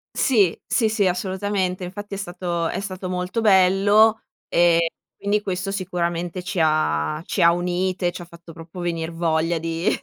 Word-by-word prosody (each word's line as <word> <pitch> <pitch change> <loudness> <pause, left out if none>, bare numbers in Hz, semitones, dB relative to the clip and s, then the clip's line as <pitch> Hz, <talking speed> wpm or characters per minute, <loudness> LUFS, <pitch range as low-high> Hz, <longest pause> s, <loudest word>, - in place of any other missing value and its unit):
Sì. 210 - +3
Sì, 225 -4 +2
sì, 215 -3 +1
assolutamente. 185 0 -1
Infatti 205 +3 -7
è 195 - -6
stato 175 -3 -3
è - - -3
stato 185 -2 -6
molto 180 +4 -2
bello, 205 +2 +4 0.3
ehm, 170 -1 +4
e 165 0 -1 0.2
quindi 205 +1 0
questo 190 -1 -3
sicuramente 175 -2 -3
ci 185 -1 -3
ha 155 - +1
ci - - -3
ha 170 - +7
unite, 180 +1 -1
ci - - -8
ha 175 - -8
fatto 170 0 -14
proprio 165 +2 -10
venir 165 -1 -2
voglia 165 0 0
di 165 +3 -2
180 Hz, 170 wpm, -22 LUFS, 170-195 Hz, 0.3 s, ha